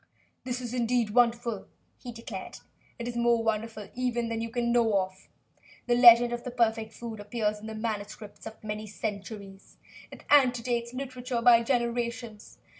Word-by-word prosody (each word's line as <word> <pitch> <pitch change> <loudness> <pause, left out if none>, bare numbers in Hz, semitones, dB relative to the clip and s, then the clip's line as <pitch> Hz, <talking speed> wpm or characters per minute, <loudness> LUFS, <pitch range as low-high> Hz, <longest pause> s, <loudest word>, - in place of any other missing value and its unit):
"This 250 0 -3
is 245 -1 -5
indeed 240 -2 +1
wonderful," 235 -2 +1 0.3
he 245 - -8
declared. 230 -4 -8 0.4
"It 235 - -5
is 240 - -4
more 235 -1 +2
wonderful, 220 -1 -2
even, 240 -2 -1
than 225 0 -2
you 230 - -3
can 235 0 -1
know 230 -4 +3
of. 185 0 -6 0.6
The 245 - +2
legend 240 0 +8
of 240 0 -4
the - - -4
perfect 225 -2 0
food 225 -2 -8
appears 210 0 -2
in 215 - -9
the 220 - -6
manuscripts 215 -1 -5
of 220 - -11
many 215 0 -5
centuries. 200 -1 -7 0.3
It - - -12
antedates 245 -4 +3
literature 250 -2 -4
by 235 -1 +7
generations. 235 -2 -2
235 Hz, 160 wpm, -28 LUFS, 215-240 Hz, 0.6 s, legend